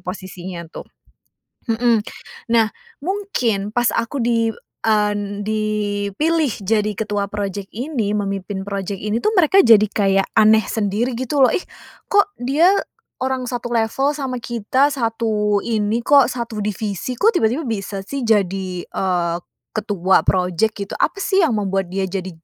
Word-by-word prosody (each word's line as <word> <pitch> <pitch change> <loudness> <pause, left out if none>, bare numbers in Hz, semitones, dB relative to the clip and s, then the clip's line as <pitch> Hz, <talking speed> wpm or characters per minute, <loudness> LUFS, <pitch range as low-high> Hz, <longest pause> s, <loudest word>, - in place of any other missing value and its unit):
posisinya 180 -1 -7
tuh. - - -9 0.8
Mhm. 230 -1 +2 0.5
Nah, 225 -1 +4 0.3
mungkin 275 - -1
pas 240 0 +2
aku 250 +5 -1
di 230 -1 +2 0.4
en 205 -1 +1
dipilih 215 +8 0
jadi 210 +1 +1
ketua 205 -1 -2
project 200 -1 -4
ini, 235 -5 -2
memimpin 195 -1 -3
project 200 -1 -4
ini 210 +2 0
tuh 430 - +1
mereka 365 0 +4
jadi 225 -3 +7
kayak 195 -2 +2
aneh 220 0 +6
sendiri 220 +4 -1
gitu 265 +2 +1
loh, 255 - +6
"Ih - - 0 0.4
kok 405 0 +3
dia 285 +9 +3 0.5
orang 260 -1 -2
satu 240 -1 -4
level 270 +6 +1
sama 265 -4 -3
kita, 240 +4 +1
satu 220 -4 0
ini 220 0 0
kok, 280 -3 +6
satu 235 -3 -4
divisi, 210 +3 -3
kok 445 +3 +4
tiba-tiba 265 0 +1
bisa 200 -3 -3
sih 275 -1 -4
jadi, 190 -5 0
eee, 175 -3 -1 0.4
ketua 200 -4 +2
project?" 185 +4 +1
Gitu. 200 0 -5
"Apa 385 - 0
sih 390 -1 +2
yang 245 -10 +2
membuat 195 -2 -1
dia 190 0 -1
jadi 185 0 -4
215 Hz, 140 wpm, -20 LUFS, 200-245 Hz, 0.8 s, jadi